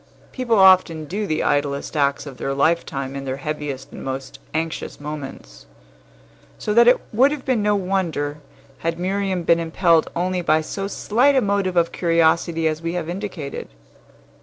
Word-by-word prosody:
People 240 Hz, -4 st, 0 dB
often 185 Hz, -5 st, +5 dB
do 205 Hz, +6 st, -3 dB
the 155 Hz, -, 0 dB
idlest 145 Hz, +1 st, -1 dB
acts 140 Hz, -1 st, +1 dB
of 135 Hz, -3 st, -9 dB
their 135 Hz, -, -3 dB
lifetime 140 Hz, -3 st, 0 dB
in 140 Hz, -, -5 dB
their 135 Hz, 0 st, -3 dB
heaviest 145 Hz, -2 st, -5 dB
and -, -, -9 dB
most 135 Hz, 0 st, -5 dB
anxious 160 Hz, +1 st, -3 dB
moments; 135 Hz, -, -8 dB, 0.9 s
so 210 Hz, -, -2 dB
that 235 Hz, +2 st, +6 dB
it 250 Hz, -, +7 dB, 0.2 s
would 255 Hz, +6 st, +5 dB
have 290 Hz, -2 st, -5 dB
been 255 Hz, -5 st, +1 dB
no 210 Hz, 0 st, +2 dB
wonder 175 Hz, -7 st, -1 dB, 0.4 s
had 165 Hz, 0 st, -2 dB
Miriam 190 Hz, 0 st, -1 dB
been 170 Hz, 0 st, +4 dB
impelled 165 Hz, 0 st, +2 dB
only 180 Hz, +1 st, 0 dB
by 155 Hz, -2 st, +3 dB
so 195 Hz, +5 st, -4 dB
slight 245 Hz, +7 st, +2 dB
a -, -, +5 dB
motive 200 Hz, -3 st, 0 dB
of 170 Hz, -1 st, +3 dB
curiosity 165 Hz, -1 st, +2 dB
as 155 Hz, 0 st, -2 dB
we 165 Hz, 0 st, -3 dB
have 170 Hz, -2 st, -3 dB
indicated. 180 Hz, -6 st, -5 dB
165 Hz, 165 wpm, -22 LUFS, 145-195 Hz, 0.9 s, it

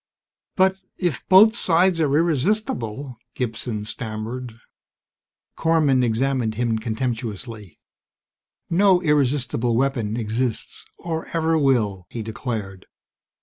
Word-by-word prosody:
"B -, -, -70 dB, 0.5 s
but 190 Hz, 0 st, +3 dB, 0.2 s
if 175 Hz, -10 st, -2 dB
both 210 Hz, +4 st, +7 dB
sides 175 Hz, -3 st, +3 dB
are 145 Hz, -2 st, +2 dB
irresistible 145 Hz, -, -1 dB
..." -, -, -55 dB
Gibson 115 Hz, -3 st, -3 dB
stammered. 115 Hz, +2 st, -5 dB, 1.0 s
Korman 155 Hz, -6 st, +2 dB
examined 120 Hz, -1 st, 0 dB
him 115 Hz, -1 st, 0 dB
contemptuously. 110 Hz, -4 st, -4 dB, 0.9 s
"No 185 Hz, +1 st, +4 dB
irresistible 130 Hz, -5 st, +1 dB
weapon 120 Hz, -5 st, 0 dB
exists, 115 Hz, +1 st, -2 dB
or 165 Hz, -1 st, -4 dB
ever 165 Hz, 0 st, +1 dB
will!" 115 Hz, -, +1 dB
he 115 Hz, -, -5 dB
declared. 110 Hz, -4 st, -5 dB
125 Hz, 105 wpm, -22 LUFS, 110-160 Hz, 1.0 s, both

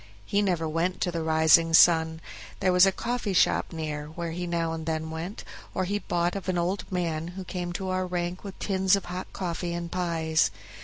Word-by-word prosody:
He 200 Hz, -, +1 dB
never 175 Hz, -5 st, 0 dB
went 165 Hz, +4 st, -1 dB
to 175 Hz, -, +1 dB
the 170 Hz, -1 st, -2 dB
Rising 160 Hz, +1 st, +5 dB
Sun; 160 Hz, -1 st, +5 dB, 0.4 s
there 185 Hz, -, +2 dB
was 180 Hz, +2 st, +7 dB
a -, -, +4 dB
coffee 235 Hz, -1 st, -2 dB
shop 180 Hz, -, +3 dB
near, 155 Hz, -2 st, -4 dB
where 165 Hz, +2 st, -5 dB
he 175 Hz, +2 st, -4 dB
now 165 Hz, -1 st, -1 dB
and 160 Hz, -1 st, -6 dB
then 160 Hz, 0 st, -2 dB
went, 165 Hz, +6 st, -6 dB, 0.3 s
or 185 Hz, -, +1 dB
he 205 Hz, +3 st, -1 dB
bought 175 Hz, -2 st, -1 dB
of 195 Hz, -1 st, -4 dB
an 180 Hz, -, 0 dB
old 180 Hz, +4 st, -2 dB
man, 165 Hz, -3 st, -1 dB
who 190 Hz, -, -4 dB
came 180 Hz, -1 st, -4 dB
to 190 Hz, +1 st, -3 dB
our 185 Hz, 0 st, -1 dB
rank 175 Hz, 0 st, -3 dB
with 195 Hz, -2 st, -8 dB
tins 190 Hz, -1 st, +2 dB
of 195 Hz, -, -4 dB
hot 180 Hz, +1 st, -6 dB
coffee 175 Hz, -1 st, -3 dB
and 170 Hz, 0 st, -5 dB
pies. 165 Hz, -, +1 dB
175 Hz, 210 wpm, -27 LUFS, 160-185 Hz, 0.4 s, was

